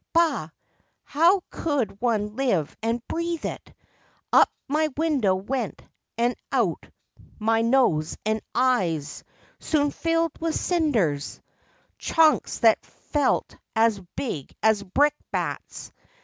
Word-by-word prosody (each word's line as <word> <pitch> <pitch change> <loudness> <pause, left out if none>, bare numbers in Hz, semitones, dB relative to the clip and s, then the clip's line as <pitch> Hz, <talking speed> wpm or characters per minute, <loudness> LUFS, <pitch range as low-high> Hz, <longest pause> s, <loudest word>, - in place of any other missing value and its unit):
Bah! 320 - +2 0.5
how 345 +5 +3
could 270 -10 -2
one 215 -3 0
live 210 - 0
and 230 +1 -2
breathe 335 0 -2
it! - - -6 0.6
Up - - +7 0.2
my 310 +3 +1
window 285 -12 +2
went, 225 +4 -3 0.4
and 240 +1 +1 0.2
out - - 0 0.5
my 225 +1 +2
Nose 230 -11 +2
and 220 0 0
eyes—soon 250 - -1
filled 330 0 0
with 330 -1 -1
cinders— 225 - 0 0.6
Chunks 315 -2 +3
that 225 -2 +5
felt 295 -2 -1 0.2
as 220 -3 +3
big 155 - -4
as 220 -2 +4
brick 280 +10 +2 0.2
bats. - - -4
245 Hz, 105 wpm, -25 LUFS, 210-310 Hz, 0.6 s, Up